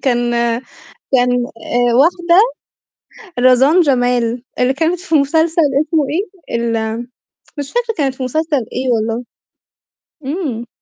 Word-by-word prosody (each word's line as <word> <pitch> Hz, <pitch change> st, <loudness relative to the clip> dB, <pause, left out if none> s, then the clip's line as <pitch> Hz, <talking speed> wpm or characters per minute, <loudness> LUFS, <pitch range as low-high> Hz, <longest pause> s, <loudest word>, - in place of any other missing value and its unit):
كان 245 Hz, -3 st, +1 dB, 0.9 s
كان 250 Hz, -1 st, +3 dB
آآ، 240 Hz, +1 st, -1 dB
واحدة 345 Hz, +6 st, +4 dB, 1.0 s
رزان 255 Hz, +7 st, +5 dB
جمال، 245 Hz, -5 st, +1 dB, 0.2 s
اللي 250 Hz, +1 st, +2 dB
كانت 330 Hz, +4 st, 0 dB
في 340 Hz, -3 st, -3 dB
مسلسل 320 Hz, +3 st, +2 dB, 0.2 s
اسمه 310 Hz, -1 st, 0 dB
إيه؟ 360 Hz, -, -4 dB
ال 225 Hz, -1 st, -1 dB, 0.6 s
مش 285 Hz, -1 st, -4 dB
فاكرة 475 Hz, -1 st, -1 dB
كانت 270 Hz, -3 st, 0 dB
في 260 Hz, -, -7 dB
مسلسل 285 Hz, -1 st, -1 dB
إيه 255 Hz, 0 st, -1 dB
والله، 225 Hz, +2 st, -1 dB, 1.0 s
إمم. 270 Hz, -7 st, -3 dB
265 Hz, 115 wpm, -16 LUFS, 245-325 Hz, 1.0 s, رزان